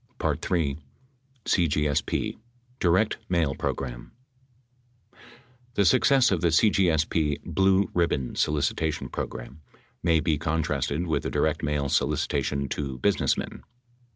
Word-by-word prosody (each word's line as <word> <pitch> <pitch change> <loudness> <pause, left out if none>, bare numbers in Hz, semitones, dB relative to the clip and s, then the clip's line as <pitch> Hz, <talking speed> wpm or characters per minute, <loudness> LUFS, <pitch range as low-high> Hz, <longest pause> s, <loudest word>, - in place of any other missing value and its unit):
3. 75 -6 0 0.7
CGSP 75 -5 0 0.4
DIRECT 95 +5 +2
MAIL 85 -6 +1
PROGRAM - - -4 1.6
The 100 - +3
success 130 +8 +4
of 90 -4 0
the 85 - +3
CGSP 80 -5 +2
"blue 95 +3 +2
ribbon" 75 -8 0
solicitation 75 -1 -1
program 60 +4 -6 0.4
may 85 -1 +3
be 75 -1 0
contrasted 80 -1 -1
with 75 -5 -1
a - - -2
direct - - 0
mail 75 -1 -1
solicitation 70 +1 0
to 70 -2 -4
businessmen. 95 +9 0
80 Hz, 100 wpm, -26 LUFS, 70-85 Hz, 1.6 s, success